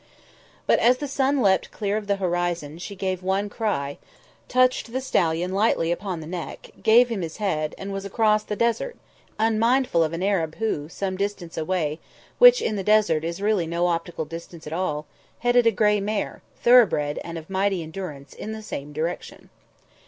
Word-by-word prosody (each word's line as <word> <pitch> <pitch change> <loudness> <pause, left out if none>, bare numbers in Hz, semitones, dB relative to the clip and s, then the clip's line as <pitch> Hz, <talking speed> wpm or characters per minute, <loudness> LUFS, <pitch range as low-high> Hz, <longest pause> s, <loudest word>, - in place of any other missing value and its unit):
But - - +4
as 250 +2 +4
the 290 - -4
sun 275 -1 +1
leapt 190 -2 +3
clear 205 -1 -2
of 215 -1 -3
the 200 - +2
horizon, 175 -4 -2
she 200 +3 -7
gave 185 -1 -2
one 190 +2 0
cry, 200 -11 -2 0.5
touched 255 -2 +2
the 260 - -1
stallion 175 -8 0
lightly 195 -5 +2
upon 180 -1 -3
the - - -8
neck, 170 0 -7
gave 240 +2 +6
him 220 -5 -2
his 165 -2 -5
head, 155 -7 -1
and 195 +1 -6
was 195 0 -4
across 215 +1 +2
the 210 - -4
desert, 235 - 0 0.4
unmindful 225 -3 +2
of 155 - -1
an 170 +2 -3
Arab 170 -6 0
who, 160 -10 -2
some 190 +1 -3
distance 200 -4 -3
away, 160 -2 -1 0.4
which, - - +8
in 215 - -1
the 195 - -2
desert, 210 -7 +3
is 170 +4 -4
really 205 -5 +1
no 170 +1 0
optical 170 -1 -2
distance 165 +1 -9
at 150 - -6
all, 155 -4 -2 0.3
headed 245 -1 +3
a - - +6
grey 210 0 +2
mare, 205 0 -3 0.2
thoroughbred 205 -12 +5
and 170 0 -6
of 160 -1 -9
mighty 195 -2 0
endurance, 155 -5 -8
in 220 - -6
the 220 0 -7
same 145 -8 -6
direction. 160 +4 -5
195 Hz, 180 wpm, -24 LUFS, 165-220 Hz, 0.5 s, which